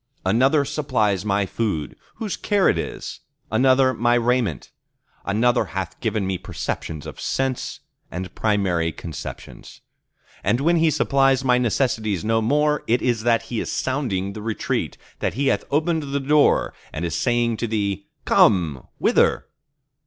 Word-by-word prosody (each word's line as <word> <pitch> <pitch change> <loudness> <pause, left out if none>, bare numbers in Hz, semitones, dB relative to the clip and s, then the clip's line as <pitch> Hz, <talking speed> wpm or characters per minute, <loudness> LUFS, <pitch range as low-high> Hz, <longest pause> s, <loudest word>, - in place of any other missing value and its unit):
Another 135 +9 +3
supplies 110 -10 0
my 100 -1 +1
food, 95 - -2 0.2
whose 215 -4 -3
care 205 -2 +2
it - - +2
is; - - -6 0.3
another 130 0 +4
my 120 0 +2
raiment; 120 -2 0 0.5
another 115 +3 +2
hath - - -4
given 105 -3 -1
me 95 -2 -2
perceptions 80 -2 -5
of - - -8
sense 135 +1 -2 0.3
and 90 0 -6
primary 95 -6 +1
conceptions. 80 -1 -9 0.6
And 120 - +2
when 170 +5 +3
He 165 0 +4
supplies 135 -2 +2
my 125 -1 +4
necessities 110 -6 0
no 115 0 +2
more, 150 +5 +2
it 120 +2 +2
is 120 -3 +1
that 115 0 +2
He 115 -1 -4
is - - -3
sounding 110 -8 -1
the 105 - -7
retreat, 110 0 -2 0.2
that - - -1
He 135 +2 +1
hath - - 0
opened 160 +3 +1
the 140 - 0
door, 145 +2 +3 0.2
and 85 - -3
is 85 - -3
saying 120 -2 +1
to 120 - -2
thee, 100 -3 -2 0.2
Come!—Wither? 80 -8 +2
120 Hz, 145 wpm, -22 LUFS, 100-135 Hz, 0.6 s, another